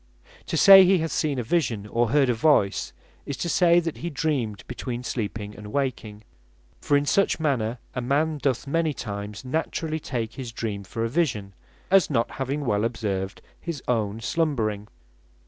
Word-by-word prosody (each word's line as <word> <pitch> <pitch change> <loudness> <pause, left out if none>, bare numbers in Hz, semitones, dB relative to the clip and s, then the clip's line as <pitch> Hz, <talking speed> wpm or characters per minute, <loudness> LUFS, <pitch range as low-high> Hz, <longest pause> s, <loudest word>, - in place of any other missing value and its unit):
To - - -1
say 195 -1 +10
he 185 +1 +4
hath 160 -1 -2
seen 145 -3 0
a 125 - -1
Vision, 115 -7 0
or 115 +2 0
heard 140 +1 +3
a 125 - +2
Voice, 110 -5 +2 0.4
is 140 - -4
to 170 - -3
say, 170 0 +4
that 165 -2 -4
he 170 - -5
hath 160 - -7
dreamed 125 -11 -1
between 125 0 -5
sleeping 105 -3 -4
and 105 0 -9
waking: 115 -6 -3 0.6
for 145 -2 +3
in 145 - 0
such 195 +5 +2
manner 125 -7 0 0.2
a 125 - -3
man 150 +5 0
doth 135 -2 0
many 155 +1 0
times 105 +2 -6
naturally 160 +3 -2
take 115 -6 -4
his 125 -3 -6
dream 105 -3 -4
for 115 +4 -4
a - - +1
vision, 115 - -1 0.4
as 195 -1 +5
not 120 -4 0
having 140 +2 -3
well 105 -3 +1
observed 105 -4 -3 0.2
his 165 -5 -6
own 110 -2 -1
slumbering. 110 -9 -1
125 Hz, 180 wpm, -25 LUFS, 110-155 Hz, 0.6 s, say